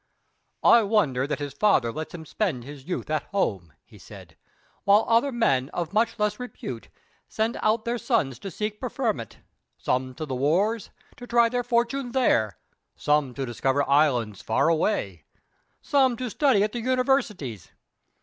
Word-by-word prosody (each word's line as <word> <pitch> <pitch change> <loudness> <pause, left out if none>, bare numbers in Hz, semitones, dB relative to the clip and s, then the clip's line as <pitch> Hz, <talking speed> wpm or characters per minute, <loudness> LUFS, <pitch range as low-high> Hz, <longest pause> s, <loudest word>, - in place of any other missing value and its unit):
"I 235 - +7
wonder 165 - +1
that 150 - -2
his 145 -2 -5
father 140 - +2
lets 155 +6 -6
him 160 -2 -9
spend 155 - -2
his 140 0 -11
youth 180 - -4
at 155 - +1
home," 95 - -2
he - - -17
said, - - -13 0.5
"while 200 +2 +5
other 235 +5 +3
men 135 - +1
of 170 0 -3
much 230 +2 +1
less 210 0 0
repute 250 0 -7 0.4
send 220 +2 -1
out 220 +1 +1
their 235 +1 -1
sons 135 - 0
to 195 - -6
seek 210 +2 -4
preferment 230 - -3 0.4
some 130 0 -1
to 155 - -5
the 140 - -5
wars, 185 - +1 0.3
to 245 - -10
try 235 -1 +4
their 245 +1 -1
fortune 240 +1 0
there; 115 - +2 0.4
some 150 -4 +1
to 135 - -3
discover 135 +3 0
islands 130 -8 +2
far 110 +8 +1
away; 130 - 0 0.6
some 265 -4 +2
to 250 -1 -4
study 260 -8 +3
at 210 - -1
the 240 - -4
universities. 245 - 0
200 Hz, 160 wpm, -25 LUFS, -, 0.6 s, I